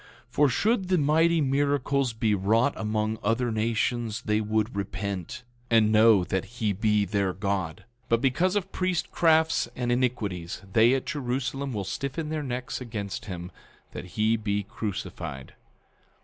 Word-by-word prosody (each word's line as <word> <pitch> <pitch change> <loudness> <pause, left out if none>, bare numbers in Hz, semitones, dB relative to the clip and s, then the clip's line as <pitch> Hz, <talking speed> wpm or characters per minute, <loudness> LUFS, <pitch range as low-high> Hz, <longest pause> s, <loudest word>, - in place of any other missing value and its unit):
10:4 - - -36
For 145 -1 +4
should 205 - +1
the 185 -1 +3
mighty 160 +2 +3
miracles 140 -1 +1
be 110 -1 0
wrought 110 +7 +2
among 110 0 -1
other 115 +3 0
nations 115 0 -1
they 105 0 +1
would 110 +1 -1
repent, 100 +3 -4 0.3
and 110 -2 +4
know 110 -3 +6
that 95 +1 -1
he 110 -4 +1
be 105 +1 +2
their 100 -1 0
God. 95 -4 -2 0.2
10:5 - - -35
But 115 - +3
because 175 +9 +2
of 205 -3 -1
priestcrafts 160 -4 +2
and 120 -1 -1
iniquities, 110 -10 -1
they 115 +3 +5
at 135 - -2
Jerusalem 135 -2 -2
will 105 -4 -3
stiffen 140 - -4
their 155 -1 -2
necks 125 -2 -4
against 105 -5 -5
him, 90 -2 -6 0.4
that - - -7
he 110 +1 +3
be 105 -1 -1
crucified. 95 - -6
115 Hz, 150 wpm, -27 LUFS, 105-135 Hz, 0.4 s, know